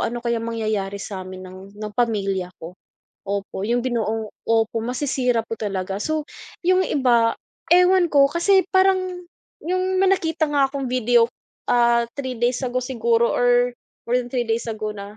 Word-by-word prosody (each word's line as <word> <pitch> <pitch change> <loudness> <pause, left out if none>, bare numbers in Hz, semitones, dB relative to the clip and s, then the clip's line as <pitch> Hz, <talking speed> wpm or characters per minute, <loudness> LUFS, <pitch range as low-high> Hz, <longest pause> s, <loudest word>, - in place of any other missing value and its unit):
ano 240 +1 -4
kaya 235 -1 0
mangyayari 215 -4 -2
sa'min 185 -2 -7
ng, 185 0 -10 0.2
ng 210 0 -6
pamilya 195 -6 0
ko? 165 +2 -8 0.5
Opo, 200 0 -3
yung 240 +2 +1
binuong 225 -3 -1 0.2
opo, 225 0 +1
masisira 250 -2 0
po 225 - -5
talaga. 195 -2 -3
So, 310 -1 -1 0.4
yung 370 +1 +4
iba, 240 -5 +3 0.4
ewan 360 0 +5
ko 275 -1 +6
kasi 375 +4 +3
parang, 375 -1 +2 0.4
yung 370 +2 0
may 385 - +4
nakita 325 -3 0
nga 280 -2 +3
akong 275 0 -4
video, 245 -1 +4 0.5
ah, 235 -1 +4
3 260 -3 -4
days 240 +1 +1
ago, 255 0 -1
siguro 235 -2 +1
or, 245 0 +3 0.4
more 245 - +3
than 245 - -7
3 245 -2 0
days 230 +1 -1
ago 215 -1 -3
na. 200 +1 -9
240 Hz, 160 wpm, -22 LUFS, 215-280 Hz, 0.5 s, ko